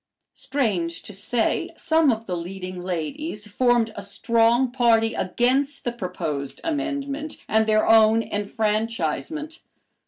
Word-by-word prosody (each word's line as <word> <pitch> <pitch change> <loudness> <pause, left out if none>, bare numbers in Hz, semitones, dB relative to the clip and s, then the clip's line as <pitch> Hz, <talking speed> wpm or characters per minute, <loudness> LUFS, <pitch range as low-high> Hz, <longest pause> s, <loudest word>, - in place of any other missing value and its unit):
Strange 185 -12 -2
to 210 - -8
say, 225 +4 0
some 320 -3 +3
of 225 0 -3
the 180 - -3
leading 185 +1 -6
ladies 205 - -4
formed 235 +1 +2
a - - -5
strong 230 +5 +2
party 230 -3 +3
against 265 +8 0
the 240 - -1
proposed 175 - -4
amendment 295 -1 -3
and 220 0 +2
their 215 0 +3
own 225 0 +6
enfranchisement. 220 - -2
225 Hz, 120 wpm, -24 LUFS, 195-265 Hz, -, own